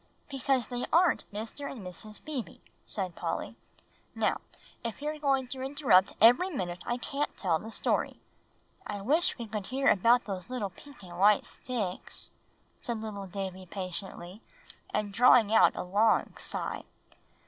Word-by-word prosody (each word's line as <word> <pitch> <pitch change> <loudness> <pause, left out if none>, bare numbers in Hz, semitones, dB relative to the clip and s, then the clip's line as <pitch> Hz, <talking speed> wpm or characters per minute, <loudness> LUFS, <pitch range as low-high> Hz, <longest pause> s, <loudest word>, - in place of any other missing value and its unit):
"Because 270 -2 0
they 245 -1 -3
aren't 345 +2 +3
Mr. 225 +7 -6
and 225 -8 -8
Mrs. 210 +4 -8
Beebe," 290 -7 -5 0.3
said 190 -4 -3
Polly. - - -3 0.6
"Now, - - +1 0.4
if 230 -2 -4
you 295 +1 -2
are 305 0 -5
going 270 -3 +1
to 260 0 -6
interrupt 265 -9 +3
every 245 - +6
minute, 180 - -4
I 240 - 0
can't 280 +4 -3
tell 170 -5 +1
the 220 - -8
story." - - -1 0.7
"I 205 - -4
wish 300 - +3
we 235 - -5
could 210 -3 -5
hear 270 +2 +2
about 235 +5 +4
those 190 0 -5 0.3
pink 280 -7 -15
and 175 -1 -10
white 205 +1 +5
sticks," 210 -8 -4 0.4
said 235 -2 -4
little 205 -3 -6
Davie 190 -1 -5
patiently, 185 +1 -6 0.5
and 210 -1 -1
drawing 235 -1 +6
a 225 - +5
long 205 +5 +2
sigh. - - -1
220 Hz, 150 wpm, -30 LUFS, 195-265 Hz, 0.7 s, every